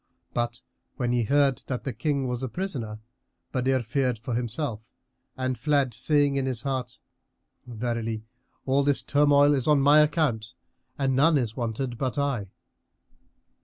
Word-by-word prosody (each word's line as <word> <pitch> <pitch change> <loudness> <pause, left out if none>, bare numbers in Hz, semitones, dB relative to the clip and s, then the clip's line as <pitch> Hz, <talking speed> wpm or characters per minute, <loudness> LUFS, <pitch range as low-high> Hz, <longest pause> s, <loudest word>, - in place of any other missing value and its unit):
But 120 0 -2 0.3
when 120 -2 -1
he 120 -2 +1
heard 140 +1 +2
that 125 -2 -3
the 135 - -3
King 135 +3 -1
was 125 0 -3
a 130 - -3
prisoner, 125 - -4 0.5
Badr 130 0 +1
feared 125 +1 0
for 120 +3 -5
himself 120 0 -2 0.6
and 130 -2 -2
fled, 140 -3 +1
saying 145 +4 +2
in 135 -1 0
his 125 -3 -2
heart, 130 -3 -3 0.7
"Verily, 115 -2 -3 0.4
all 135 +1 +3
this 140 -1 +1
turmoil 145 0 +4
is 135 -1 0
on 150 -2 +5
my 145 +2 +6
account 145 -7 +1 0.4
and 135 -2 +1
none 150 +4 +5
is 120 -4 -1
wanted 120 0 -3
but 130 +1 -2
I." 135 -9 -1
130 Hz, 150 wpm, -26 LUFS, 120-140 Hz, 0.7 s, my